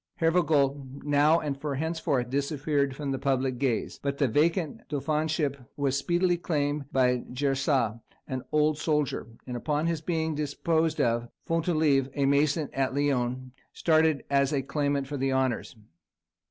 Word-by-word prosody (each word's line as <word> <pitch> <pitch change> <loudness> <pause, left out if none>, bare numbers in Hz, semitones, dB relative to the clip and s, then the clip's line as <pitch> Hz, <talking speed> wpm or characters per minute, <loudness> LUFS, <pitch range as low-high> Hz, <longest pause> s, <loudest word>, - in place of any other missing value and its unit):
Hervagault 145 -5 +1
now 145 +3 +4
and 145 -3 -3
for 145 -2 -2
henceforth 150 -5 -1
disappeared 140 0 0
from 140 -1 -3
public 130 -2 0
gaze, 130 -5 -1
but 140 0 -2
the 140 - +2
vacant 160 - +1
dauphinship 150 0 0 0.2
was 140 -2 +1
speedily 175 +5 +1
claimed 145 -4 -2
by 125 -2 +2
Jersat, 135 -3 0 0.3
an 130 -1 -3
old 150 0 +2
soldier; 150 -7 0 0.2
and 125 - -5
upon 150 +5 -1
his 165 -2 -1
being 160 -1 -1
disposed 160 +2 0
of, 120 -2 +1 0.2
Fontolive, 155 -5 +2
a 140 - +1
mason 145 +2 +2
at 135 0 0
Lyons, 130 -3 0 0.2
started 160 -2 +2
as 140 -1 +2
a 140 -3 0
claimant 140 0 -1
for 145 +1 -5
the 135 0 0
honours. 130 -3 -1
145 Hz, 140 wpm, -28 LUFS, 135-155 Hz, 0.3 s, now